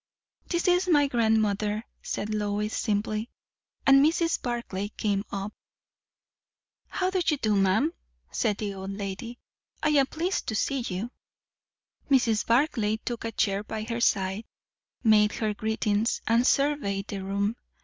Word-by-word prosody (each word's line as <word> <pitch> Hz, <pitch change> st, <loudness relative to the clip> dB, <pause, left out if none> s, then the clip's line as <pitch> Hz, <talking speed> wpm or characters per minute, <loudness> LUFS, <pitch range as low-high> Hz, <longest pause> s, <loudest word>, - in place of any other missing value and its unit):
"This 345 Hz, +1 st, 0 dB
is 360 Hz, +1 st, +3 dB
my 295 Hz, -5 st, +5 dB
grandmother," 220 Hz, -3 st, +1 dB, 0.2 s
said 215 Hz, +1 st, -3 dB
Lois 210 Hz, 0 st, -1 dB
simply; 215 Hz, +1 st, -1 dB, 0.6 s
and 275 Hz, 0 st, +7 dB
Mrs. 330 Hz, +2 st, +2 dB
Barclay 235 Hz, -5 st, -3 dB
came 200 Hz, -2 st, 0 dB
up. 200 Hz, +1 st, -4 dB, 1.3 s
"How 370 Hz, 0 st, -1 dB
do 375 Hz, -1 st, +1 dB
you 300 Hz, -3 st, +1 dB
do, 215 Hz, -5 st, +1 dB
ma'am?" 195 Hz, -, +2 dB, 0.4 s
said 210 Hz, -4 st, 0 dB
the 205 Hz, -2 st, -3 dB
old 190 Hz, 0 st, -6 dB
lady. 200 Hz, +4 st, -5 dB, 0.5 s
"I 305 Hz, -, +3 dB
am 280 Hz, -3 st, +4 dB
pleased 345 Hz, +6 st, -2 dB
to 220 Hz, -, -2 dB
see 275 Hz, +5 st, 0 dB
you." 225 Hz, 0 st, -4 dB, 1.0 s
Mrs. 240 Hz, -6 st, +3 dB
Barclay 230 Hz, -4 st, +2 dB
took 235 Hz, +1 st, -5 dB
a 230 Hz, -, -2 dB
chair 200 Hz, -2 st, 0 dB
by 215 Hz, 0 st, -5 dB
her 230 Hz, +1 st, -3 dB
side, 195 Hz, 0 st, +1 dB, 0.6 s
made 210 Hz, -2 st, +5 dB
her 215 Hz, -2 st, -1 dB
greetings, 220 Hz, +1 st, 0 dB
and 230 Hz, +2 st, +3 dB
surveyed 275 Hz, -9 st, +1 dB
the 195 Hz, -2 st, -4 dB
room. 200 Hz, +3 st, -1 dB
220 Hz, 140 wpm, -27 LUFS, 205-260 Hz, 1.3 s, and